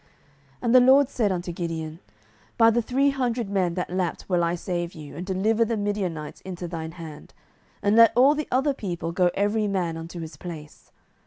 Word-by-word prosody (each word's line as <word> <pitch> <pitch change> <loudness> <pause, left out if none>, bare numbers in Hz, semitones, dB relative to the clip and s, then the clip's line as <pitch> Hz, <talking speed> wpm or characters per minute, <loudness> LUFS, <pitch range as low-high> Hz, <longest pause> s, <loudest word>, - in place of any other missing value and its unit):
07:007:007 140 - -33 0.5
And 235 0 +2
the - - +10
LORD 265 +2 +5
said 220 -7 0
unto 175 -1 -3
Gideon, 165 -2 -5 0.6
By 225 -1 +6
the 240 +1 +2
three 270 +5 +2
hundred 240 -5 -2
men 185 -4 0
that 180 -1 -3
lapped 180 -2 -2
will 180 -2 +1
I 170 +1 +1
save 175 -1 -4
you, 150 -3 -10
and 170 - -5
deliver 205 +5 +1
the 230 0 -1
Midianites 195 -7 -3
into 180 -2 -6
thine 165 -1 -6
hand: 160 -4 -11 0.5
and 205 +1 +3
let 230 0 +8
all 265 +4 +6
the 305 0 -3
other 270 +3 +2
people 175 -8 -4
go 180 +1 +2
every 205 +2 +1
man 180 -5 -1
unto 165 +2 -7
his 160 -3 -8
place. 155 -3 -10
185 Hz, 195 wpm, -25 LUFS, 170-230 Hz, 0.6 s, the